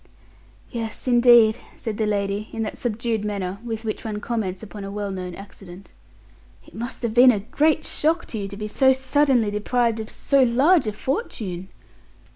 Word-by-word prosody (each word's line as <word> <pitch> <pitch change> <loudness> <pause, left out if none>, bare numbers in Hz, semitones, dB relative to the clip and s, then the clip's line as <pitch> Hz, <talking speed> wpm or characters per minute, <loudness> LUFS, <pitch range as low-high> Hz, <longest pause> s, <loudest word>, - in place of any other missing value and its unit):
"Yes, 230 0 -5
indeed," 240 -2 +6 0.2
said 220 -2 -4
the 215 - +1
lady, 200 0 -2
in 225 - -3
that 215 - -4
subdued 225 -2 -2
manner 200 -2 -3
with 225 -1 -5
which 215 - -3
one 215 -2 -4
comments 205 -5 -3
upon 210 -1 -8
a 195 - -6
well 205 0 -4
known 180 -2 -5
accident, 195 -1 -12 0.7
"it - - -18
must 240 +3 -6
have 230 -2 -1
been 250 +2 +7
a 210 -5 +2
great 305 +8 +1
shock 325 +3 +1
to 220 - -4
you 200 - -3
to 200 0 -9
be 210 0 -4
so 265 +5 +4
suddenly 265 -4 +2
deprived 230 +2 0
of 220 - -6
so 275 -1 +1
large 265 +5 +4
a - - 0
fortune." 210 - -4
220 Hz, 180 wpm, -23 LUFS, 205-245 Hz, 0.7 s, been